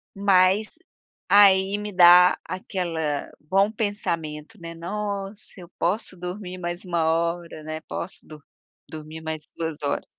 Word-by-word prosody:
Mas 195 +4 +3 0.5
aí 195 -1 +5
me 210 0 -5
dá 180 0 +7
aquela 165 -5 -3
bom 195 +7 +2
pensamento, 180 -5 -3
né, 165 0 -8
nossa 200 +3 -4 0.2
eu 175 - -12
posso 185 +1 -2
dormir 180 +1 -6
mais 175 0 -5
1 175 -3 -1
hora, 170 0 -1
né, 155 0 -5
posso 175 - -7 0.6
dormir 155 0 -9
mais 160 -1 -5
2 160 -2 -3
horas. 140 - -1
180 Hz, 125 wpm, -24 LUFS, 165-195 Hz, 0.6 s, dá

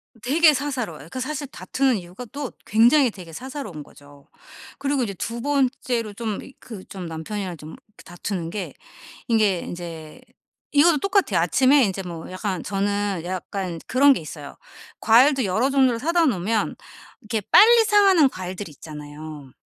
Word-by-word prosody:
음 - - -21
되게 305 +4 +5
사사로워요. 250 - -4
그 260 - -5
사실 285 +2 -4
다투는 265 -2 0
이유가 180 +6 -9
또 285 -2 -5
굉장히 240 +4 +4
되게 175 -5 -11
사사로운 250 - -7
거죠. 145 0 -18 0.5
그리고 280 -2 0
이제 200 - -3
2 230 +5 -5
번째로 250 -5 -1
좀 215 -1 -4
이 270 - -13
그 210 -6 -10
좀 185 -3 -8
남편이랑 175 +3 -5
좀 155 +1 -10 0.3
다투는 175 -1 -5
게 195 0 -5 0.5
이게 215 -6 +2
인제 165 -3 -8 0.5
이것도 300 +2 +5
똑같아요. 395 +2 +1
아침에 265 +1 +4
인제 195 -2 -2
뭐 170 -2 -8
약간 185 -2 -3
저는 200 -2 -1
약간 185 -1 -4
그런 280 +2 +5
게 - - -3
있어요. 150 -2 -9 0.4
과일도 255 +4 +5
여러 220 +8 +1
종류를 260 -4 +3
사다 335 +4 +2
놓으면 215 - 0 0.5
이렇게 215 0 -3
빨리 460 +2 +8
상하는 390 -8 +5
과일들이 185 -3 -7
있잖아요. 150 -1 -10
215 Hz, 330 characters per minute, -23 LUFS, 175-270 Hz, 0.5 s, 빨리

